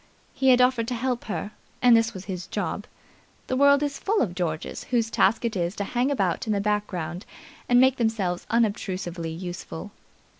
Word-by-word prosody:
He 265 0 +2
had 250 -1 +6
offered 250 -2 +3
to 250 - -2
help 245 0 -2
her, 210 -1 -4 0.3
and 245 -2 +6
this 225 0 +3
was 190 0 -9
his 185 -2 -5
job. - - -3 0.6
The 255 - -2
world 280 +1 +5
is 285 -1 -2
full 425 +2 +1
of 185 -7 -3
Georges 165 -3 -3
whose 230 -2 0
task 225 +4 +2
it 230 - -1
is 175 +1 -1
to 200 - -2
hang 245 +6 0
about 195 -8 0
in 215 - +1
the 200 - +1
background 200 -4 -2 0.5
and 245 0 +6
make 260 0 +5
themselves 215 -7 -1
unobtrusively 190 -7 -1
useful. 175 +2 -7
220 Hz, 185 wpm, -25 LUFS, 185-245 Hz, 0.6 s, had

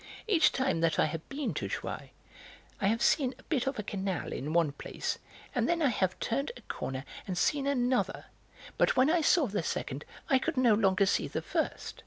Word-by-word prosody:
Each 395 -8 +4
time 265 -10 0
that 165 -1 +2
I - - +4
have 155 +1 -3
been 270 - -2
to 105 -9 -3
Jouy - - -5 0.7
I - - +3
have 225 +3 +1
seen 265 -4 +3
a 260 - -18
bit 270 -5 -1
of 270 - -1
a 210 - -2
canal 190 -4 -3
in 145 +3 -4
one 165 -3 +3
place, 140 - -4 0.3
and - - +1
then 340 0 +2
I 295 -5 +3
have 185 -5 0
turned 275 - -1
a - - -13
corner 135 +1 -5 0.2
and 185 -2 -3
seen 280 +8 +1
another, 255 -2 +1 0.5
but - - +4
when 260 +4 +5
I 345 -1 +3
saw 315 0 +4
the 205 -5 -1
second 145 -3 -3 0.2
I 265 - +4
could 320 +2 -2
no 245 -3 +5
longer 200 -2 +3
see 195 - +1
the - - -4
first. - - -2
230 Hz, 210 wpm, -30 LUFS, 180-275 Hz, 0.7 s, when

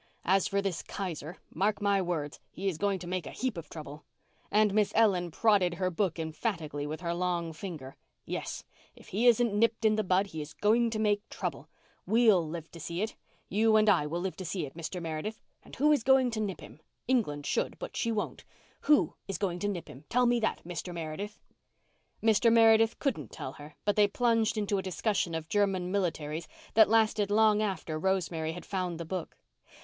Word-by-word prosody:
As 190 +2 +3
for 200 0 0
this 190 -4 -2
Kaiser, 175 -3 -5 0.2
mark 205 +2 +1
my 200 -1 +2
words, 160 -5 -3
he 195 +3 -5
is 170 -5 -1
going 200 -1 +1
to 180 - -9
make 180 -1 -3
a - - -6
heap 255 -4 -2
of 170 -2 -8
trouble"—and 155 +7 -3
Miss 210 -1 +2
Ellen 195 -6 +3
prodded 190 -2 +3
her 185 +1 -1
book 180 -1 0
emphatically 160 -3 -3
with 155 +2 -5
her 170 -1 -1
long 175 -2 -1
finger. 155 -6 -7 0.3
"Yes, - - -4 0.3
if - - -16
he 225 +6 +2
isn't 235 -2 +4
nipped 225 +1 +2
in 215 0 +4
the 215 - +1
bud 185 +1 +2
he's 155 -5 -7
going 230 +3 +3
to 220 - -3
make 210 -1 0
trouble. - - -5 0.4
We'll 220 -6 +5
live 165 +1 -7
to 170 - -11
see 170 +4 -3
it—you 220 0 -1
and 215 0 +5
I 175 -8 +4
will 170 +3 -3
live 190 0 -3
to 190 - -5
see 175 -2 -3
it, 135 - -10
Mr. 170 +2 -5
Meredith. 165 +6 -4 0.2
And - - -13
who 300 +3 +3
is 295 - +3
going 260 0 +4
to 225 - -3
nip 205 -4 -3
him? - - -12 0.3
England 175 - 0
should, - - -1
but - - -7
she 230 - 0
won't. 215 -2 -3 0.4
Who 300 -1 +4
is 195 - -3
going 180 -1 -2
to 205 - -1
nip 185 -5 -4
him? 140 +4 -12
Tell 250 +1 +3
me 240 0 +3
that, 220 - -1
Mr. 175 +1 -5
Meredith." 170 +6 -5 0.9
Mr. 225 +1 +4
Meredith 225 0 +5
couldn't 180 - -2
tell 130 - -6
her, 150 +1 -12
but 205 - +2
they 210 -1 +5
plunged 230 0 +1
into 205 -1 0
a - - -1
discussion 185 -1 -1
of 160 -1 -4
German 190 -1 +1
militarism 160 -5 -2 0.2
that 220 -1 +6
lasted 215 -2 +3
long 215 0 +4
after 185 -6 -2
Rosemary 165 -3 0
had 175 - -9
found 180 -3 -3
the 170 - -4
book. 180 0 -5
195 Hz, 200 wpm, -30 LUFS, 165-215 Hz, 0.9 s, that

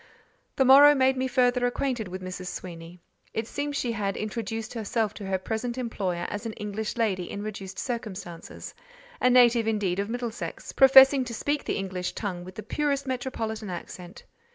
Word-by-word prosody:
The 265 - +3
morrow 285 +3 +8
made 265 -1 +3
me 260 0 -1
further 245 0 +2
acquainted 245 -3 -2
with 185 +1 -7
Mrs. 185 0 -6
Sweeny. 170 -1 -8 0.4
It 225 - -1
seems 285 +2 -3
she 245 - -1
had 200 -3 -2
introduced 225 +1 -4
herself 220 -1 -1
to 205 - -8
her 190 0 0
present 225 +5 -3
employer 190 -8 -2
as 205 +3 -4
an 220 - -5
English 210 +1 -4
lady 190 -6 0
in 200 - -5
reduced 195 -3 -7
circumstances: 205 -8 -6 0.5
a 250 - +5
native, 240 -2 +5
indeed, 200 -4 0
of 200 +1 -2
Middlesex, 240 -1 -5
professing 270 0 +7
to 235 -2 -5
speak 290 +5 -1
the - - -1
English 185 -2 -3
tongue 185 -5 -4
with 185 +1 -11
the 215 - -7
purest 285 -2 -1
metropolitan 230 -5 -4
accent. 180 +2 -8
220 Hz, 175 wpm, -27 LUFS, 195-250 Hz, 0.5 s, morrow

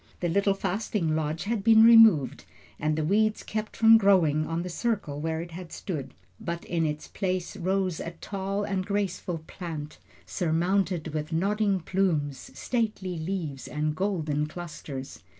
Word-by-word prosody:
The 175 - -1
little 200 +3 +2
fasting 195 -5 -1
lodge 155 +1 -2
had 215 -1 -2
been 225 0 +7
removed 220 - +6 0.3
and 155 0 0
the 155 - -1
weeds 215 +5 +2
kept 215 0 -4
from 225 0 +7
growing 165 -7 +3
on 165 +1 -2
the - - -5
circle 175 -8 -2
where 160 0 -2
it 170 0 -8
had 175 0 -8
stood; 150 - -5 0.2
but 170 0 -5
in 165 -2 0
its 150 0 -4
place 185 -1 -3
rose 185 -2 -1
a - - -4
tall 195 +3 -4
and 195 -2 -1
graceful 185 -4 -2
plant, 155 -5 -7 0.3
surmounted 175 0 0
with 155 +1 -4
nodding 200 +3 +1
plumes, 160 -7 -1
stately 210 -7 -2
leaves, 160 -5 -4
and 150 0 -2
golden 155 -6 -1
clusters. 155 -5 -8
175 Hz, 150 wpm, -27 LUFS, 155-200 Hz, 0.3 s, been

